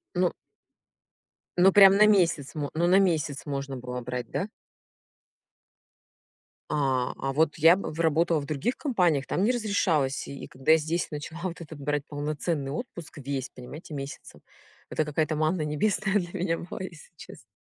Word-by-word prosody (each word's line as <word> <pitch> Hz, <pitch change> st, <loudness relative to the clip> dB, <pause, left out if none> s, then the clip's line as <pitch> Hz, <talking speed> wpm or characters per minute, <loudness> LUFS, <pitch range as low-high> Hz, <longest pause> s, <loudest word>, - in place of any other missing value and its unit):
Ну 180 Hz, -1 st, +2 dB, 1.3 s
ну 190 Hz, +2 st, +7 dB
прям 195 Hz, -1 st, +8 dB
на 210 Hz, -, +7 dB
месяц 175 Hz, -9 st, +2 dB
мо 145 Hz, -2 st, -2 dB
ну 170 Hz, +2 st, +2 dB
на 190 Hz, +2 st, +6 dB
месяц 155 Hz, -7 st, 0 dB
можно 140 Hz, -1 st, -3 dB
было 125 Hz, 0 st, -5 dB
брать, 125 Hz, -1 st, -5 dB
да? 195 Hz, -, -2 dB, 2.2 s
А, 135 Hz, -4 st, 0 dB
а 135 Hz, -, -2 dB
вот 155 Hz, +1 st, +2 dB
я 165 Hz, +3 st, +7 dB
б 195 Hz, -, -4 dB
в 160 Hz, -, -8 dB
работала 165 Hz, 0 st, +2 dB
в 140 Hz, -, -7 dB
других 155 Hz, -, -1 dB
компаниях, 175 Hz, -, +1 dB
там 185 Hz, -, -1 dB
не 225 Hz, -, +4 dB
разрешалось. 190 Hz, -, 0 dB
И 140 Hz, -, -8 dB
когда 135 Hz, +5 st, +2 dB
я -, -, +6 dB
здесь 160 Hz, +2 st, -2 dB
начала 150 Hz, +2 st, -6 dB
вот 175 Hz, -2 st, -4 dB
это- 160 Hz, -1 st, -9 dB
брать 145 Hz, 0 st, -2 dB
полноценный 145 Hz, -1 st, -2 dB
отпуск 170 Hz, -, -7 dB
весь, 135 Hz, -1 st, -4 dB
понимаете, 145 Hz, +6 st, -10 dB
месяцем- 135 Hz, -1 st, -8 dB, 0.5 s
это 155 Hz, -, 0 dB
какая 150 Hz, +1 st, 0 dB
то 155 Hz, +1 st, -3 dB
манна 155 Hz, +2 st, +1 dB
небесная 195 Hz, +7 st, 0 dB
для 175 Hz, -2 st, -5 dB
меня 170 Hz, -1 st, 0 dB
была, 175 Hz, -, -7 dB
если 175 Hz, -3 st, -9 dB
честно. 115 Hz, -7 st, -13 dB
155 Hz, 165 wpm, -27 LUFS, 140-175 Hz, 2.2 s, прям